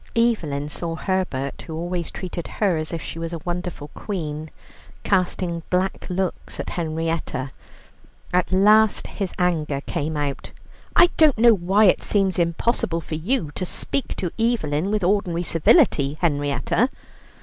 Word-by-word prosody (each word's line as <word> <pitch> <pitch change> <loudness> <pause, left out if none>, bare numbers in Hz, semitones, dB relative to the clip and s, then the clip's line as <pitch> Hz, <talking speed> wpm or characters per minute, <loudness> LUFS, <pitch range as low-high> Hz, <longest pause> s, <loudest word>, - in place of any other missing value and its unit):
Evelyn 170 -12 +1
saw 165 +2 -4
Herbert, 160 -7 -2
who 160 - -7
always 175 +1 -3
treated 175 -2 -6
her 200 -5 +2
as 155 0 -3
if 165 - -4
she 165 - -6
were 165 0 -3
a 170 - -3
wonderful 175 -4 -4
queen, 155 -7 -5 0.5
casting 180 -3 0
black 185 +2 0
looks 185 0 -3
at - - -3
Henrietta. 160 -5 -2 0.8
At 180 0 +2
last 210 +2 +5
his 195 -3 -4
anger 160 -6 0
came 150 +2 -3
out: 145 -2 -3 0.4
"I 350 - +7
don't 310 -6 +5
know 235 +1 +7
why 195 +2 +2
it 185 - +4
seems 195 -3 +1
impossible 170 0 0
for 160 - -8
you 165 - -1
to 185 - -4 0.3
talk 275 - -1
to 180 -3 -3
Evelyn 195 -8 +1
with 210 -2 0
ordinary 180 -2 +1
civility, 160 - +3
Henrietta." 145 - +1
175 Hz, 145 wpm, -23 LUFS, 155-195 Hz, 0.8 s, I